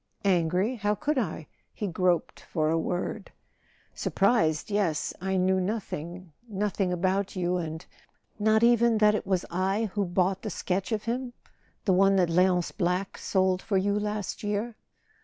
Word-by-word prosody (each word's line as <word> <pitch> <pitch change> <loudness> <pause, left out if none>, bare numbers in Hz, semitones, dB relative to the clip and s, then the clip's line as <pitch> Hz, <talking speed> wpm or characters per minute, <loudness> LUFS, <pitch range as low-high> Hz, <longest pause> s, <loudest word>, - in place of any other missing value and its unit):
"Angry? 185 +6 +2
How 210 0 0
could 290 +6 0
I?" 160 -8 -3 0.3
He 210 - -3
groped 180 -2 0
for 155 -1 -1
a 165 - +2
word. 180 +5 -3 0.6
"Surprised—yes. 195 -4 +1
I 190 0 0
knew 185 +1 +2
nothing... 180 -4 -5 0.2
nothing 200 -2 -1
about 190 +3 0
you 180 0 0
and.. 160 -1 -5 0.3
." - - -45
"Not 220 +1 +3
even 235 -1 +4
that 210 0 +5
it 210 - -2
was 190 -2 0
I 195 +4 0
who 205 -2 0
bought 185 +2 0
the 215 - -4
sketch 190 +2 -2
of 215 -1 -1
him—the 240 -4 -4
one 195 +1 +4
that 180 -3 +2
Leonce 180 0 +3
Black 180 +1 -1
sold 185 -1 +1
for 200 -3 0
you 200 +2 +1
last 210 -1 -3
year 210 +3 -2
190 Hz, 155 wpm, -27 LUFS, 180-210 Hz, 0.6 s, that